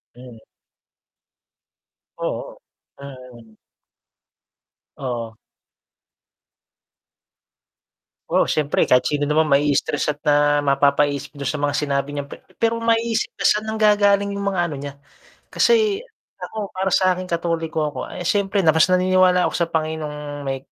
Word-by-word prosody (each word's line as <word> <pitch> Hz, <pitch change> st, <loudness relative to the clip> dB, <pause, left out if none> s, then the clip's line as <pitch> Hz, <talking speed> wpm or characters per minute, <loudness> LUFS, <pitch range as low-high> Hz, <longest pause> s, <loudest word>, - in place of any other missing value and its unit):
Mm. 125 Hz, -2 st, -13 dB, 1.8 s
Oo, -, -, -5 dB, 0.4 s
mm. 125 Hz, -5 st, -12 dB, 1.4 s
Oo. 120 Hz, -4 st, -5 dB, 2.9 s
Oo, -, -, +3 dB
siyempre 150 Hz, -1 st, +1 dB
kahit 125 Hz, 0 st, +3 dB
sino 145 Hz, 0 st, 0 dB
naman 150 Hz, +1 st, +1 dB
ma-istress 145 Hz, +1 st, +1 dB
at 145 Hz, -, -25 dB
na 145 Hz, 0 st, +3 dB
mapapaisip 140 Hz, 0 st, +1 dB
dun 140 Hz, -2 st, -5 dB
sa 150 Hz, -, -3 dB
mga 145 Hz, 0 st, -1 dB
sinabi 140 Hz, -1 st, -1 dB
niyang 145 Hz, -1 st, -5 dB
pe -, -, -9 dB, 0.2 s
pero 230 Hz, 0 st, +2 dB
maiisip 230 Hz, 0 st, 0 dB
na -, -, -4 dB
saan 210 Hz, +1 st, +2 dB
nanggagaling 205 Hz, -2 st, +3 dB
yung 200 Hz, -, -4 dB
mga 185 Hz, -, -2 dB
ano 150 Hz, -, -5 dB
niya, 140 Hz, 0 st, -7 dB, 0.5 s
kasi 435 Hz, -2 st, +2 dB, 0.3 s
ako 215 Hz, -2 st, -6 dB
para 190 Hz, +1 st, -1 dB
sa'kin 185 Hz, 0 st, +2 dB
Katoliko 165 Hz, -2 st, -1 dB
ako 145 Hz, -, -8 dB
ay -, -, -7 dB
siyempre 200 Hz, 0 st, +1 dB
na 160 Hz, -4 st, +3 dB
naniniwala 185 Hz, +2 st, +3 dB
ako -, -, -5 dB
sa 170 Hz, -, 0 dB
Panginoong 150 Hz, -2 st, -4 dB
may 135 Hz, -1 st, -3 dB
150 Hz, 120 wpm, -21 LUFS, 140-185 Hz, 2.9 s, Oo